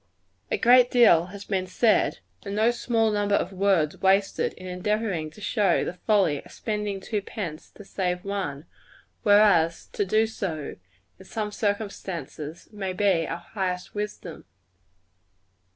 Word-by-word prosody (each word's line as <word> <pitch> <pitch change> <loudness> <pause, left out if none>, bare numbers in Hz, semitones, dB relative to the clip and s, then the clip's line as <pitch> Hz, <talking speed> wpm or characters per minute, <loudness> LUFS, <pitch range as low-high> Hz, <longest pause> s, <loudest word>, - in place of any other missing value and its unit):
A 465 - 0
great 245 - +6
deal 230 -10 +5
has 200 +2 -10
been 190 -2 -1
said, 215 - +2 0.2
and 200 - -5
no 220 +3 +3
small 230 -2 +1
number 205 -1 +1
of 190 0 -1
words 185 -6 +1
wasted, 195 +1 +2
in 185 - -12
endeavoring 185 -2 -2
to 160 +7 -16
show 195 -2 +2
the - - -3
folly 180 -6 +1
of - - -16
spending 210 -2 -3
two 210 +2 -3
pence 180 -6 -6
to 205 - -12
save 180 -1 -2
one; 185 -8 -3 0.6
whereas, 205 -6 +4
to - - 0
do 215 +3 +2
so, 170 -9 -4 0.4
in 190 - -13
some 210 +1 -4
circumstances, 190 -7 -4
may 195 -3 -4
be 185 -4 +2
our 165 - -3
highest 180 0 -4
wisdom. 205 -5 -6
195 Hz, 145 wpm, -26 LUFS, 180-210 Hz, 0.6 s, great